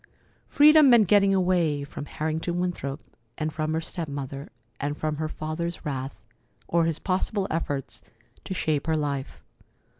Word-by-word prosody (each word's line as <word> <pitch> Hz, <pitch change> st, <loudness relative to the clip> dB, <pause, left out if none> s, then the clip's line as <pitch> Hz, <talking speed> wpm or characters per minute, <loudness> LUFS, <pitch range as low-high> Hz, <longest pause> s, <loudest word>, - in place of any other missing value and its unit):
Freedom 300 Hz, -1 st, +7 dB
meant 235 Hz, -5 st, +6 dB
getting 200 Hz, +1 st, +5 dB
away 175 Hz, -6 st, +2 dB
from 140 Hz, 0 st, -7 dB
Harrington 160 Hz, +4 st, -2 dB
Winthrop 160 Hz, -6 st, -3 dB, 0.4 s
and 155 Hz, 0 st, -2 dB
from 155 Hz, 0 st, -2 dB
her 160 Hz, -, 0 dB
step 165 Hz, 0 st, -4 dB
mother, 140 Hz, 0 st, -6 dB, 0.3 s
and 145 Hz, +1 st, -2 dB
from 155 Hz, -1 st, -2 dB
her 155 Hz, 0 st, -2 dB
father's 160 Hz, +3 st, -4 dB
wrath, 135 Hz, -2 st, -4 dB, 0.4 s
or 170 Hz, -1 st, +2 dB
his 165 Hz, -2 st, 0 dB
possible 190 Hz, +2 st, -1 dB
efforts 145 Hz, -4 st, -3 dB, 0.4 s
to 190 Hz, -, -4 dB
shape 155 Hz, -3 st, -1 dB
her 160 Hz, -1 st, +2 dB
life. 140 Hz, -, -3 dB
155 Hz, 150 wpm, -26 LUFS, 145-180 Hz, 0.4 s, Freedom